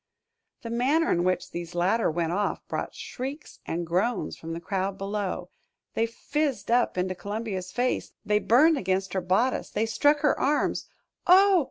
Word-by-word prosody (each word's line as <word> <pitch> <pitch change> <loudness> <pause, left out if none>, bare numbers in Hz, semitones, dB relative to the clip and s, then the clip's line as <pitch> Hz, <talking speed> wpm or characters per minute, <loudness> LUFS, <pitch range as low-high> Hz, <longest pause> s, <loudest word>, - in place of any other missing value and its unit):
The 230 - -5
manner 275 +8 +2
in 175 - +2
which 185 0 0
these 175 0 -6
latter 190 +6 +2
went 165 0 -1
off 205 +3 -1
brought - - -4
shrieks 275 +5 -7
and 170 +1 -2
groans 190 +9 0
from 165 0 -7
the 165 - -4
crowd 190 +2 -2
below. 195 -3 -3 0.4
They 225 - +1
fizzed 280 +2 -2
up 240 -5 +2
into 185 +1 0
Columbia's 200 -1 -4
face, 250 +3 -1
they 210 0 +3
burned 290 +8 +5
against 190 0 -1
her 190 - 0
bodice, 190 +9 +1
they 215 +2 0
struck 290 +6 +3
her 295 -3 +3
arms. 290 +2 0 0.4
"Oh! 380 +1 +7
210 Hz, 165 wpm, -27 LUFS, 185-255 Hz, 0.4 s, Oh